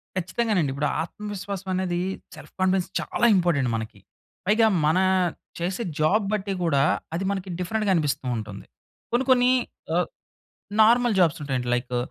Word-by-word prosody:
ఖచ్చితంగానండి. 185 - 0
ఇప్పుడు 140 +2 -1
ఆత్మవిశ్వాసం 200 +1 -6
అనేది 185 -2 -1 0.4
సెల్ఫ్ - - -13
కాన్ఫిడెన్స్‌ 185 -1 +1
చాలా - - -1
ఇంపార్టెంట్ 170 -8 +2
మనకి. 110 -2 -6 0.5
పైగా 220 +2 +4 0.2
మన 160 +4 +3 0.6
చేసే 185 +7 -2 0.2
జాబ్ 195 +8 +3
బట్టి 200 -1 -1
గూడా, 140 -5 +3 0.3
అది 170 +3 -2
మనకి 190 -1 -4
డిఫరెంట్‌గా 205 +3 0
అనిపిస్తూ 150 -5 -1
ఉంటుంది. 105 -2 -7 0.5
కొన్ని 245 +3 +1
కొన్ని 250 0 +5 0.4
ఆహ్, - - +2 0.7
నార్మల్ 235 +1 +4
జాబ్స్ 165 -2 +3
ఉంటాయండి, 130 -4 -2
లైకు 125 0 -2
185 Hz, 135 wpm, -25 LUFS, 150-210 Hz, 0.7 s, కొన్ని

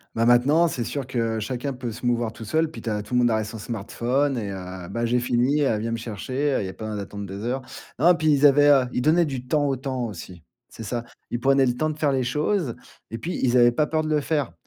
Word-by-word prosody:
Ben, 115 - +2
maintenant, 140 +8 +4
c'est 120 -6 -3
sûr 140 +2 -3
que 115 -3 -1
chacun 130 +4 -3
peut 125 -2 -5
se 115 +3 -8
mouvoir 120 -2 +1
tout 115 - -10
seul. 155 +8 0
Puis, - - -9
tu 115 - -4
as 105 -1 -2
tout 125 - -4
le - - +4
monde 120 - +4
ar 110 -1 +1
est - - -1
son 110 +1 -7
smartphone 120 +6 -1
et 105 -3 -3
heu: 90 -2 -7
«Ben, 115 0 -3
j'ai 120 +1 +2
fini, 125 +4 +1
elle 115 -7 +1
vient 115 +1 -2
me 115 - -1
chercher». 130 +6 -2
Il - - -3
y 95 - -4
a - - -7
pas 110 - -8
besoin 110 - -4
d'attendre 100 +1 -7
des 100 +2 -7
heures. 125 +3 -2 0.4
Non, 175 +5 +6
puis, 155 -2 +2
ils 145 0 +4
avaient 145 +1 +6
heu, 135 -3 +5
ils 125 - 0
donnaient 165 +5 +4
du 130 -4 -5
temps 145 +2 +1
au 135 - +1
temps 130 -1 -3
aussi. 90 -4 -8 0.3
C'est 115 - -10
ça. 120 +2 -3 0.3
Ils 120 - -1
prenaient 135 +1 +4
le 125 -1 0
temps 155 +5 0
de 155 - -5
faire 145 -3 +2
les 130 -1 +1
choses 150 - -1 0.4
et 115 - -4
puis, 170 +10 -4
ils 125 -1 +3
avaient 120 -1 +6
pas 150 +4 +1
peur 155 0 0
de 155 - -3
le 150 -1 +2
faire, 145 - -1
125 Hz, 280 wpm, -24 LUFS, 115-145 Hz, 0.4 s, Non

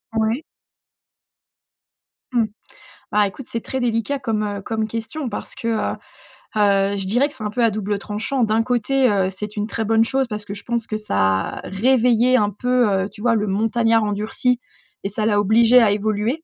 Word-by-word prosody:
Ouais. 220 +5 0 1.9
Mmh. 235 -2 +3 0.7
Bah, 210 -1 +4
écoute 235 +6 -8
c'est 230 - -3
très 265 - -4
délicat 240 +3 0
comme, 225 -5 -1
heu, 205 -1 -4
comme 220 0 -2
question 230 +6 -4
parce 210 - -6
que, 230 - -4
heu 225 -2 0 0.6
heu, 200 -1 +3
je 195 - -3
dirais 245 +8 +2
que - - -17
c'est 230 - -8
un 210 - -1
peu 240 +2 0
à 230 - +4
double 210 0 -2
tranchant. 220 +6 -2
D'un 220 +1 +2
côté, 250 +2 +2
heu, 195 -2 +1
c'est 205 +2 -7
une 210 0 -1
très 225 0 -3
bonne 225 +1 +4
chose 265 +3 0
parce 210 -2 -5
que 200 - -6
je 200 -1 -9
pense 235 0 -2
que 215 - -2
ça 95 - 0
réveillait 245 +3 +3
un 210 -4 +3
peu, 245 +2 +1
heu, 195 0 0
tu 210 - -14
vois? 235 0 +3
Le 210 -1 0
montagnard 225 +3 +2
endurci 215 +4 0 0.4
et 195 - -2
ça 210 +2 -2
l'a 210 -2 +3
obligé 225 +4 +5
à 220 -3 +4
évoluer, 215 +8 -1
220 Hz, 195 wpm, -21 LUFS, 205-240 Hz, 1.9 s, obligé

